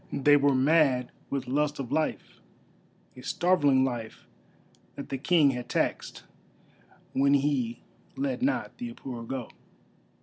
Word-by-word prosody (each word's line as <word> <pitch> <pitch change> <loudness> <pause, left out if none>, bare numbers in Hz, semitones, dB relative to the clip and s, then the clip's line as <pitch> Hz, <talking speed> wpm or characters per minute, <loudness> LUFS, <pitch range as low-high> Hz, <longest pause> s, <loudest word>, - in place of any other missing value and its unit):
They 145 +1 +4
were 140 -1 +3
mad 135 -2 +3 0.2
with 135 -2 -3
lust 145 +3 0
of 135 -4 -6
life, 155 +1 -2 0.8
a 125 - -11
starveling 145 -4 +2
life 120 -4 -5 0.7
that 140 - -8
the 135 - -2
King 150 -1 +4
had 125 -2 -6
taxed, - - -2 0.9
when 140 +1 +3
he 135 -4 -1 0.3
let 265 -2 -2
not 275 +3 -1
the 240 -1 -5
Apura 120 - -8
go. 130 -2 -5
140 Hz, 130 wpm, -28 LUFS, 130-150 Hz, 0.9 s, They